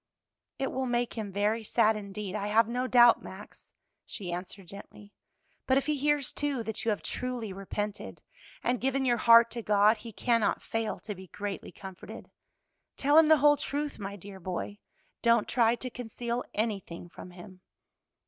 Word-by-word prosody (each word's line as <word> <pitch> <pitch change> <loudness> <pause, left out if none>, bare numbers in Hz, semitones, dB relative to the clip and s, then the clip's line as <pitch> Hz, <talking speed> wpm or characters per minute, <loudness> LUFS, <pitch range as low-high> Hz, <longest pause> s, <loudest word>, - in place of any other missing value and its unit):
"It 270 - -2
will 260 0 -2
make 240 0 0
him 215 -3 -5
very 210 +3 0
sad 220 0 +3
indeed, 200 -1 -6
I 205 -1 -2
have 220 +1 +4
no 250 +2 -2
doubt, 240 -2 +6
Max," - - -12 0.3
she 180 -5 -6
answered, 180 +1 -7
gently, 200 +2 -11 0.5
"but 260 - +4
if 275 - +1
he 305 0 +1
hears, 290 -1 +1
too, 285 -5 -1
that 220 -1 -4
you 230 - 0
have 210 - -1
truly 245 -5 -4
repented 205 +2 -5 0.4
and 245 0 0
given 270 +1 0
your 240 -2 +3
heart 230 +1 +7
to 235 - -4
God, 210 +1 +4
he 230 +2 -10
cannot 230 0 +1
fail 225 -1 -3
to 210 - -5
be 190 -1 -12
greatly 205 +2 -6
comforted. 190 -2 -10 0.7
Tell 285 +2 +2
him 320 0 +8
the 315 0 +7
whole 295 +1 +5
truth, 290 -1 -3
my 200 0 -5
dear 195 0 -11
boy, 185 +3 -5 0.4
don't 235 -2 +3
try 235 -1 +3
to 255 +2 -6
conceal 240 0 -4
anything 200 -6 -3
from 180 - -11
him." 180 +1 -13
225 Hz, 175 wpm, -29 LUFS, 200-250 Hz, 0.7 s, him